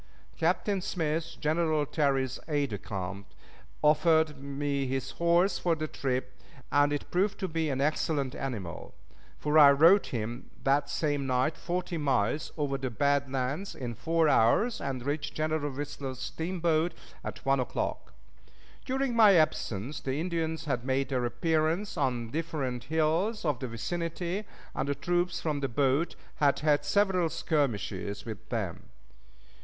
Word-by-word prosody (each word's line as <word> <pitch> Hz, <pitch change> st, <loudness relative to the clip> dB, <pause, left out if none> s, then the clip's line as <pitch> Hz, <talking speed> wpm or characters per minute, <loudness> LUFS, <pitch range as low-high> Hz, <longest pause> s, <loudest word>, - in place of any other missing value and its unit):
Captain 200 Hz, -3 st, +1 dB
Smith, 165 Hz, -3 st, -2 dB
General 155 Hz, -1 st, +1 dB
Terry's 135 Hz, -3 st, 0 dB
aid 145 Hz, -5 st, 0 dB
de 100 Hz, -, -3 dB
camp, 100 Hz, 0 st, -5 dB, 0.6 s
offered 155 Hz, 0 st, +4 dB
me 140 Hz, 0 st, -2 dB
his 135 Hz, 0 st, -2 dB
horse 170 Hz, +3 st, +2 dB
for 170 Hz, -2 st, +1 dB
the 155 Hz, 0 st, -3 dB
trip, 130 Hz, -3 st, -3 dB, 0.3 s
and 145 Hz, 0 st, +4 dB
it 145 Hz, -, -3 dB
proved 195 Hz, +3 st, +1 dB
to 190 Hz, -, -1 dB
be 160 Hz, -2 st, -1 dB
an 135 Hz, -2 st, -1 dB
excellent 145 Hz, -2 st, 0 dB
animal; 105 Hz, -, -5 dB, 0.4 s
for 150 Hz, +1 st, +3 dB
I 145 Hz, -2 st, +10 dB
rode 165 Hz, +8 st, +6 dB
him 120 Hz, +1 st, -4 dB
that 140 Hz, +1 st, +2 dB
same 145 Hz, -3 st, -1 dB
night 130 Hz, +4 st, +1 dB
forty 175 Hz, -1 st, -3 dB
miles 140 Hz, +1 st, 0 dB
over 140 Hz, -2 st, -1 dB
the 130 Hz, -1 st, -2 dB
bad 140 Hz, +2 st, +1 dB
lands 135 Hz, +9 st, -2 dB
in 120 Hz, -3 st, -4 dB
four 165 Hz, +6 st, +1 dB
hours, 150 Hz, -, +3 dB
and 130 Hz, -3 st, -3 dB
reached 145 Hz, 0 st, -2 dB
General 155 Hz, -1 st, -1 dB
Whistler's 140 Hz, -1 st, -5 dB
steamboat 165 Hz, +3 st, -1 dB, 0.3 s
at -, -, -7 dB
one 135 Hz, 0 st, +3 dB
o'clock. 125 Hz, -, -3 dB, 0.7 s
During 265 Hz, -2 st, -1 dB
my 215 Hz, -4 st, +7 dB
absence 140 Hz, -, 0 dB
the 135 Hz, +2 st, -2 dB
Indians 160 Hz, -2 st, -2 dB
had 125 Hz, -5 st, -1 dB
made 135 Hz, +1 st, 0 dB
their 125 Hz, -3 st, 0 dB
appearance 160 Hz, -, 0 dB
on 130 Hz, -6 st, 0 dB
the 115 Hz, -, -11 dB
different 140 Hz, -6 st, -3 dB
hills 160 Hz, -, +1 dB
of 145 Hz, -6 st, +1 dB
the 130 Hz, -, -3 dB
vicinity, 170 Hz, -, -3 dB, 0.3 s
and 140 Hz, -, -2 dB
the 140 Hz, -, +1 dB
troops 175 Hz, +5 st, 0 dB
from 150 Hz, -3 st, -1 dB
the 140 Hz, -, -1 dB
boat 140 Hz, +6 st, +1 dB, 0.2 s
had 145 Hz, -2 st, +3 dB
had 145 Hz, -1 st, +2 dB
several 185 Hz, +1 st, +2 dB
skirmishes 105 Hz, -, -1 dB
with 110 Hz, -3 st, -8 dB
them. 105 Hz, -8 st, -4 dB
145 Hz, 150 wpm, -29 LUFS, 130-165 Hz, 0.7 s, I